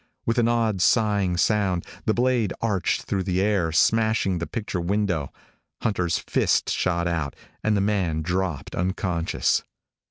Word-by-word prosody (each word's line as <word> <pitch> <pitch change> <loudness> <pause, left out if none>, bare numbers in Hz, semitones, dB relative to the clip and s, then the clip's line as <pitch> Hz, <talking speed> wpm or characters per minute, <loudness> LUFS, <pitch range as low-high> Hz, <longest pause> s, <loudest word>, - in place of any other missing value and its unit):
With 115 +1 +1
an 115 - +3
odd, 115 -5 +1
sighing 100 -2 +2
sound, 95 -1 +1 0.2
the 110 - +2
blade 120 -4 +1
arched 105 -5 0
through 95 - -1
the 90 -1 -1
air, 95 -5 +1
smashing 110 0 +2
the 85 - -3
picture 100 -6 -3
window. 90 -5 -1 0.5
Hunter's 90 -6 0
fist - - +1
shot 85 -1 0
out, 80 -5 -2 0.3
and 110 -1 +2
the - - +1
man 95 -6 0
dropped 90 -4 -2
unconscious. 90 -2 0
95 Hz, 140 wpm, -24 LUFS, 85-105 Hz, 0.5 s, an